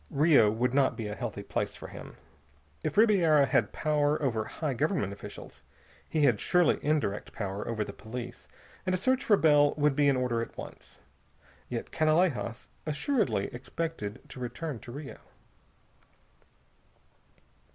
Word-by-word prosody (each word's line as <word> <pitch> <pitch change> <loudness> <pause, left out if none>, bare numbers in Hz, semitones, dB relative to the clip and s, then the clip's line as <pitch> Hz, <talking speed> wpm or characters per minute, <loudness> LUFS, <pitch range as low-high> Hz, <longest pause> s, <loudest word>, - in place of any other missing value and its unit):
Rio 145 -7 +5
would 120 +4 0
not 135 -1 +2
be 115 - -4
a 105 - -4
healthy 110 -3 -5
place - - -2
for - - -9
him. - - -10 0.7
If 155 +4 -2
Ribiera 175 -10 +5
had - - +1
power 150 -1 +1
over 115 -7 0
high 155 -4 -3
government 135 - 0
officials, 85 -7 -10 0.5
he 155 -2 +1
had 120 -7 +4
surely 180 -1 +3
indirect 145 -9 -1
power 100 -1 -4
over 110 -2 -1
the 100 - -8
police, 120 +4 -8 0.4
and 185 0 +1
a - - 0
search 260 +7 +1
for 205 - +4
Bell 145 -3 +4
would 145 -2 +2
be 145 0 +3
in 135 - +2
order 125 -2 0
at 115 - -7
once. - - -10 0.7
Yet 120 -2 -4
Canalejas 155 -7 +1
assuredly 150 - 0
expected 125 -4 -5
to - - -9
return 130 +2 -4
to 120 - -10
Rio. 145 +3 -8
140 Hz, 150 wpm, -29 LUFS, 115-155 Hz, 0.7 s, Rio